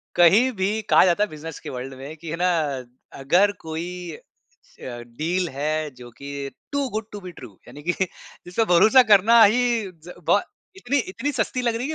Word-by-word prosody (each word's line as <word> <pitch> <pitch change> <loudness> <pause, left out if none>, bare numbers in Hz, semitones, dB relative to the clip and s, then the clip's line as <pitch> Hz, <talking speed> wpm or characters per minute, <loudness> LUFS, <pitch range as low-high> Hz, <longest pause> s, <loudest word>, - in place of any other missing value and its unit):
कहीं 200 +9 +5
भी 210 +3 0
कहा - - +6
जाता 185 +3 +2
है 210 - -2
बिज़नेस 155 0 -8
के - - -8
वर्ल्ड 130 +1 -6
में 140 +4 -8
कि 165 +1 -9
है - - -2
ना 180 - +3 0.7
अगर 180 +9 +3
कोई 160 +2 -5 0.3
अ, - - -14 0.6
डील 140 +9 -3
है 150 +3 -2
जो 120 -1 -11
कि 140 0 -6 0.2
to 285 -1 -1
good 220 -1 -4
to 205 - -7
be 180 -1 -8
true 120 - -11 0.2
यानि 145 - -11
कि 175 +2 0
जिसपे 180 +3 -5
भरोसा 235 +9 +7
करना 225 +3 +7
ही 220 +4 +4 0.3
ज़ 165 0 -16 0.2
बहो - - +5 0.4
इतनी 280 -5 -1
इतनी 260 +9 -3
सस्ती 255 -1 -1
लग 235 -2 0
रही 230 - -3
है - - -6
175 Hz, 190 wpm, -23 LUFS, 150-220 Hz, 0.7 s, भरोसा